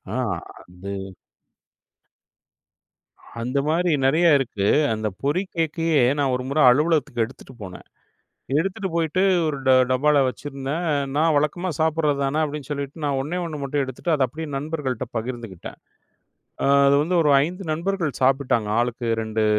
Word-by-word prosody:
அ - - -1 0.4
அது 90 +2 -11 2.5
அந்த 125 +4 -1
மாரி 175 +3 +1 0.2
நெறைய 160 +6 +4
இருக்கு. 115 -7 -2 0.3
அந்த 110 0 -2 0.2
பொறி 145 +6 +1
கேக்கையே, 165 -2 +1 0.2
நான் 135 -2 +1
ஒரு 125 - -3
முறை 145 +3 +1
அலுவலகத்துக்கு 150 -4 +1
எடுத்துட்டு 130 +2 -14
போனேன். 90 -2 -10 0.7
எடுத்துட்டு 190 +3 -2
போயிட்டு, 165 +2 0 0.3
ஒரு 150 -2 -2
ட - - +6 0.2
டப்பால 145 +3 +3
வச்சுருந்தேன். 140 +6 -4 0.3
"நா 150 - +3
வழக்கமா 150 +5 0
சாப்புடுறது 155 -2 +1
தான." 140 +3 0
அப்படீன்னு 150 -2 -5
சொல்லிட்டு, 140 +2 -5
நான் 140 -2 0
ஒண்ணே 155 +6 -4
ஒண்ண 160 -3 -5
மட்டும் 140 +1 -1
எடுத்துட்டு, 130 +6 -3
அத 140 -3 +2
அப்டியே 160 +6 -7
நண்பர்கள்ட்ட 140 -4 -3
பகிர்ந்துக்கிட்டேன். 115 -6 -7 1.1
அது 140 - +5
வந்து 175 +4 0
ஒரு 150 - +3
5 180 +5 -6
நண்பர்கள் 170 -1 -1
சாப்பிட்டாங்க. 130 -5 +2
"ஆளுக்கு 120 0 -2 0.2
2 110 0 -1
145 Hz, 135 wpm, -23 LUFS, 130-160 Hz, 2.5 s, ட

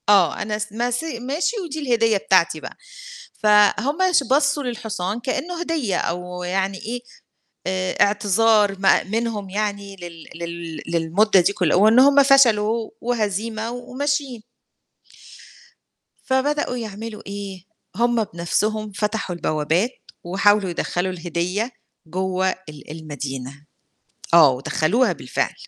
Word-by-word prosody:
آه، 195 -5 +4
أنا 210 0 -2
س 210 0 -5
ماشي 245 +4 -2
ماشي 290 - -1
ودي 315 -1 -5
الهدية 230 -6 +2
بتاعتي 185 -4 +2
بقى. - - -9 0.7
فهم 210 +8 +4 0.2
ش 295 - +5
بُصّوا 285 +1 +3
للحصان 220 -4 -3
كإنّه 325 +8 -3
هدية 305 - -1
أو 180 +1 -3
يعني 190 +2 -1
إيه، 240 +5 -5 0.7
آآ 185 0 -1
إعتذار 205 0 +3
ما 195 -1 +4
منهم 215 -1 -3
يعني 200 0 -3
لل 170 -3 -10
لل 170 -2 -6
للمدّة 170 +5 +3
دي 190 +3 +1
كل 180 -6 +1
وإن 215 +6 +6
هم 280 +1 +7
فشلوا 230 -5 +4
وهزيمة 220 -1 -2
و 245 +1 -8
وماشيين. 280 -3 -2 1.8
فبدؤوا 265 0 0
يعملوا 220 -1 -6
إيه، 200 -2 -7 0.3
هم 235 +1 +2
بنَفْسهم 210 +4 -2
فتحوا 210 -2 -2
البوّابات 160 +7 0 0.3
وحاولوا 200 +2 +2
يدخّلوا 175 +2 -2
الهدية 180 +6 -2 0.4
جوّه 185 +2 0
ال 155 -6 -8
المدينة. 140 -3 -7 0.7
آه، 160 -5 +8
ودخّلوها 155 - +1
بالفعل. - - -2
205 Hz, 115 wpm, -22 LUFS, 180-235 Hz, 1.8 s, آه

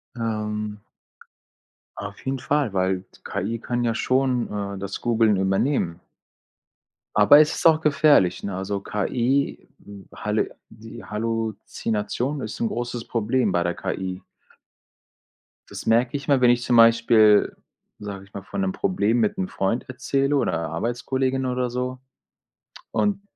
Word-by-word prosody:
Ähm 105 -2 -3 1.2
auf 100 0 -7
jeden 135 0 -2
Fall, 140 -5 0
weil 95 0 0 0.2
KI 115 +4 -3
kann 120 0 -2
ja 115 - +1
schon, 130 +1 +1
äh, 100 -1 -4
das 100 0 -5
Googeln 115 -3 +3
übernehmen. 95 - 0 1.2
Aber, 105 +8 +7
es 155 0 +4
ist - - +3
auch 160 -1 +5
gefährlich, 145 - +3
ne, 100 -2 -4
also 100 +1 -3
KI, 125 +7 -1 0.2
hm, 100 -2 -12
Halle - - -2
die 110 +1 -11
Halluzination 115 +4 -3
ist 110 - -6
'n 115 - +1
großes 120 0 -4
Problem 115 -1 0
bei 90 -1 +1
der 85 0 -1
KI. 95 -1 -4 1.5
Das - - -8
merke 120 +4 +2
ich 140 - -10
immer, 140 -3 +3
wenn 125 - +6
ich 120 0 +3
zum 120 - +1
Beispiel, 115 -2 +5 0.4
sage 100 -2 -7
ich 100 - -25
mal, 100 - -7
von 195 - -4
'nem 190 0 0
Problem 120 - +1
mit 205 - +1
'm 190 -1 -1
Freund 105 - -2
erzähle 135 +2 0
oder 140 - +1 0.2
Arbeitskollegin 130 - -1
oder 125 -1 -1
so 125 +1 -3 0.9
und 200 -1 0
115 Hz, 140 wpm, -23 LUFS, 105-130 Hz, 1.5 s, Aber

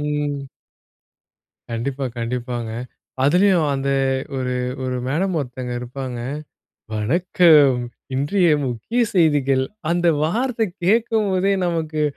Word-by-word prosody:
ம். 150 0 -1 1.4
கண்டிப்பா, 130 +4 -2
கண்டிப்பாங்க. 120 -1 -3 0.5
அதிலேயும் 180 +2 +4
அந்த 135 0 -1 0.5
ஒரு 125 -1 -1 0.3
ஒரு 130 0 -2
மேடம் 175 +7 0
ஒருத்தங்க 125 -2 -5
இருப்பாங்க. 125 0 -6 0.8
"வணக்கம். 150 +2 +4 0.3
இன்றைய 165 +7 +2 0.2
முக்கிய 125 - -2
செய்திகள்." 145 -6 +3 0.3
அந்த 175 0 +2 0.2
வார்த்தை 230 +5 0 0.2
கேட்கும்போதே 200 -2 +2
நமக்கு, 160 -2 -1
145 Hz, 90 wpm, -21 LUFS, 130-180 Hz, 1.4 s, அதிலேயும்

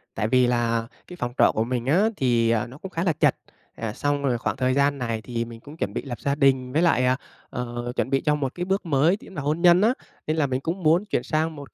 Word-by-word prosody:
Tại 105 - 0
vì 125 +1 +4
là 115 -1 0 0.2
cái 180 - -9
phòng 120 -4 -3
trọ - - +5
của 110 - +1
mình 120 0 -2
á 190 +11 +3
thì, 120 -3 +2
à, 115 +1 +1
nó 130 +4 -12
cũng 190 +4 -9
khá 165 - -2
là 170 -4 +2
chật. - - +2 0.4
À, 110 -2 -3
xong 145 0 -1
rồi 125 -3 +1
khoảng 115 - -3
thời 130 0 +1
gian 140 +1 +2
này 115 -3 -3
thì 115 -1 -3
mình 115 -1 -10
cũng 145 +6 -13
chuẩn - - -3
bị - - -2
lập 120 -5 -7
gia 140 0 0
đình, 130 -3 +2
với 160 - +2
lại, 130 -8 +3
à, 130 +1 +2 0.3
ờ, 120 0 -4
chuẩn - - -1
bị 135 - +1
cho 150 -1 +2
một 135 -3 -3
cái 175 0 -3
bước 195 0 -1
mới 160 +5 +3
chính 195 - -14
là 145 - -3
hôn 150 +4 -1
nhân 175 +1 +6
á, 230 +4 +4 0.3
nên 155 +1 0
là 145 -3 +2
mình 130 +1 -2
cũng 175 +4 -3
muốn 170 +6 +3
chuyển - - -1
sang 155 0 -1
một 140 -1 -11
135 Hz, 280 wpm, -24 LUFS, 120-160 Hz, 0.4 s, nhân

